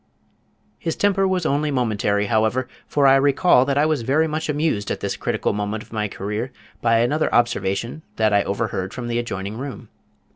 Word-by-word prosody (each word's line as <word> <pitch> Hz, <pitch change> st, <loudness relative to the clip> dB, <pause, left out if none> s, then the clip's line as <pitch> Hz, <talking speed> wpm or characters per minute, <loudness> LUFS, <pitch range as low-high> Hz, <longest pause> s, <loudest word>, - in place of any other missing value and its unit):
His 165 Hz, -, -2 dB
temper 195 Hz, -1 st, +2 dB
was 185 Hz, -2 st, 0 dB
only 150 Hz, +1 st, +1 dB
momentary, 105 Hz, -6 st, 0 dB
however, 110 Hz, +3 st, +1 dB, 0.2 s
for 145 Hz, -1 st, +2 dB
I 135 Hz, 0 st, +7 dB
recall 140 Hz, 0 st, +4 dB
that 140 Hz, 0 st, 0 dB
I 145 Hz, -, +4 dB
was 155 Hz, -4 st, +1 dB
very 145 Hz, +7 st, +2 dB
much 155 Hz, 0 st, -3 dB
amused 150 Hz, -8 st, 0 dB
at -, -, -2 dB
this -, -, -2 dB
critical -, -, -1 dB
moment 105 Hz, +1 st, -3 dB
of -, -, -17 dB
my 105 Hz, -1 st, -1 dB
career 105 Hz, +6 st, -4 dB, 0.3 s
by 115 Hz, -1 st, +3 dB
another 150 Hz, +6 st, +1 dB
observation 120 Hz, +3 st, 0 dB
that 110 Hz, -1 st, +2 dB
I 100 Hz, -, +5 dB
overheard 100 Hz, -2 st, -3 dB
from 120 Hz, -2 st, -5 dB
the 120 Hz, 0 st, 0 dB
adjoining 100 Hz, -2 st, -4 dB
room. 135 Hz, -6 st, -7 dB
120 Hz, 185 wpm, -22 LUFS, 105-145 Hz, 0.3 s, I